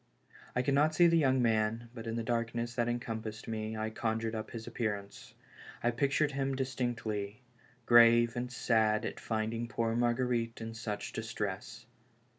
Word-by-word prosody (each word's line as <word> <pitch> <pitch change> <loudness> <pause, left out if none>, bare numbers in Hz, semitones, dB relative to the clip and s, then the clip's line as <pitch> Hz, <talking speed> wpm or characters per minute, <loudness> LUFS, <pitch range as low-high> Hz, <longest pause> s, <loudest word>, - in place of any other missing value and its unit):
I 125 - +2
could 140 - +1
not 150 +3 +3
see 175 - +6
the 170 0 +5
young 130 -4 +3
man, 115 +1 +1
but 115 -2 -8
in 115 - -2
the 115 - -2
darkness 115 0 -1
that 120 0 0
encompassed 110 -2 -4
me, 110 -1 -3
I 110 0 -2
conjured 110 0 -1
up 110 -1 -4
his 115 -2 -7
appearance. 105 -4 -4 0.5
I 120 - +3
pictured 140 +4 +1
him 135 -1 -1
distinctly, 120 -4 -3 0.4
grave 120 0 +6
and 125 0 -3
sad 110 -3 +2
at - - -4
finding 115 +1 -2
poor 115 -1 -1
Marguerite 120 -1 0
in 115 0 -5
such 110 -2 -5
distress. 115 0 -4
115 Hz, 160 wpm, -32 LUFS, 110-120 Hz, 0.5 s, see